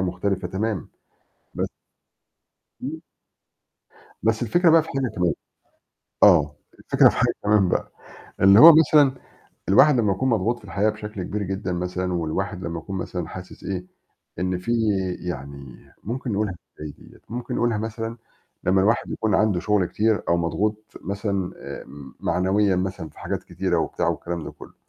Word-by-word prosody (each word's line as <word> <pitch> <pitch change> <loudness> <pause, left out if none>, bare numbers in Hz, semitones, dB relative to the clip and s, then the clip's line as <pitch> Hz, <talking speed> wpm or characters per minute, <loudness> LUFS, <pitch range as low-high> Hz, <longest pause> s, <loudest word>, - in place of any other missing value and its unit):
مختلفة 95 +1 -2
تمامًا، 100 -2 -3 0.7
بس - - -2 1.1
إمم. 155 +5 -5 1.2
بس 110 +1 +1
الفكرة 170 - +3
بقى 165 0 +6
في 160 - -12
حاجة 135 -2 -1
كمان، 90 -2 +2 0.9
آه. 75 +1 +6 0.2
الفكرة - - +5
في - - -4
حاجة - - +2
كمان 105 -3 +3
بقى، - - -1 0.5
اللي 100 +3 +7
هو 165 +2 +12
مثلًا 150 -3 +5 0.5
الواحد 145 +10 +6
لمّا 105 -3 +2
يكون 130 +7 -1
مضغوط 115 +1 +1
في - - -21
الحياة 105 +2 +1
بشكل 105 -2 -7
كبير 105 +3 -3
جدًا 95 0 -3
مثلًا 90 +1 -2
والواحد 90 +3 -3
لمّا 85 0 -3
يكون 95 +3 -6
مثلًا 90 -3 -4
حاسس 90 +1 -10
إيه، 90 -2 -4 0.5
إن 90 +1 -1
فيه 105 +6 -3 0.6
يعني 70 -4 -7 0.3
ممكن 120 +2 -3
نقولها 100 -2 -1 0.3
إزاي 75 -1 -5
ديّة! - - -17
ممكن 120 +1 -5
نقولها 120 -2 +1
مثلًا 115 +1 -4 0.5
لمّا 95 +1 +3
الواحد 110 +5 +1
يكون 110 -3 -1
عنده 105 -5 +2
شغل 105 -2 +2
كتير 110 +3 +1
أو 85 - +3
مضغوط 105 +6 -1 0.2
مثلًا 100 -2 -3
آآ - - -8 0.4
معنويًا 95 +2 +1
مثلًا 90 -3 -3
في - - -20
حاجات - - -4
كتيرة - - -1
وبتاع - - -1
والكلام 85 -2 -3
ده - - -6
كلُّه، - - -14
100 Hz, 155 wpm, -23 LUFS, 90-110 Hz, 1.2 s, هو